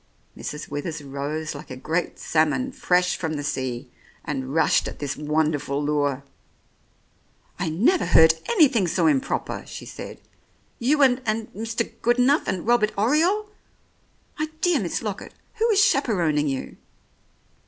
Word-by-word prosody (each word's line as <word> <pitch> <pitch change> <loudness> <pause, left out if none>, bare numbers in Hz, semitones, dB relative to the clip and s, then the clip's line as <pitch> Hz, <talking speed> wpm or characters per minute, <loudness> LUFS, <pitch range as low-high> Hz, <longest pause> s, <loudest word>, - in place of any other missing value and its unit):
Mrs. 150 +1 -6
Withers 150 +1 -5
rose 145 +3 -4
like 145 +1 -10
a 130 - -6
great 160 +6 -2
salmon 160 - +1
fresh 180 -6 +1
from 160 -2 -3
the 145 - -4
sea, 130 -2 -3 0.3
and 135 -4 -3
rushed 165 - +3
at - - -7
this 145 -2 -3
wonderful 150 -2 0
lure. 145 -2 0 1.4
"I 175 -2 -1
never 240 - +2
heard 160 0 +7 0.2
anything 280 - +4
so - - +1
improper," 275 -4 0
she - - -8
said. - - -9 0.6
"You 280 +5 +3
and 260 -1 +4
— - - -26
and 215 +1 -2
Mr. 225 +2 -2
Goodenough 250 +5 +3
and 185 - -2
Robbie 235 -2 +3
Oriole! 340 - +2 0.9
My 310 - 0
dear 355 -5 +3
Miss 185 -1 -3
Lockett, 205 -3 -5 0.2
who 455 +1 +2
is 410 -2 +5
chaperoning 170 - +1
you 135 -2 -4
180 Hz, 145 wpm, -24 LUFS, -, 1.4 s, heard